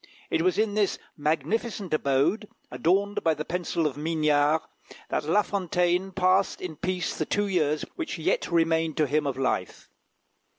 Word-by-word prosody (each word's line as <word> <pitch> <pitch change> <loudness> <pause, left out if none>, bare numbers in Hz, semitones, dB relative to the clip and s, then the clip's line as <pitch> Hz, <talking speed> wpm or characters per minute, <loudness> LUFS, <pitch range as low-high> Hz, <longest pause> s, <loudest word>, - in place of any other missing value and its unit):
It - - +2
was 180 +1 +2
in 215 -1 +1
this 210 -2 +1 0.2
magnificent 190 +5 -1
abode, 150 +9 +1 0.2
adorned 190 +11 +1
by 160 -1 +3
the 150 +1 -5
pencil 170 -1 -1
of 145 -2 -1
Mignard, 150 0 +2 0.5
that - - -1
La 200 +7 +3
Fontaine 180 -1 0
passed 185 +1 +2
in 170 -4 -6
peace 180 +2 -2
the 155 - -2
two 205 - +1
years 155 -6 0
which 335 -2 -3
yet - - 0
remained 165 -2 +2
to 155 - +3
him 150 +1 0
of 135 -2 -2
life. 125 -8 -2
165 Hz, 160 wpm, -26 LUFS, 150-195 Hz, 0.5 s, by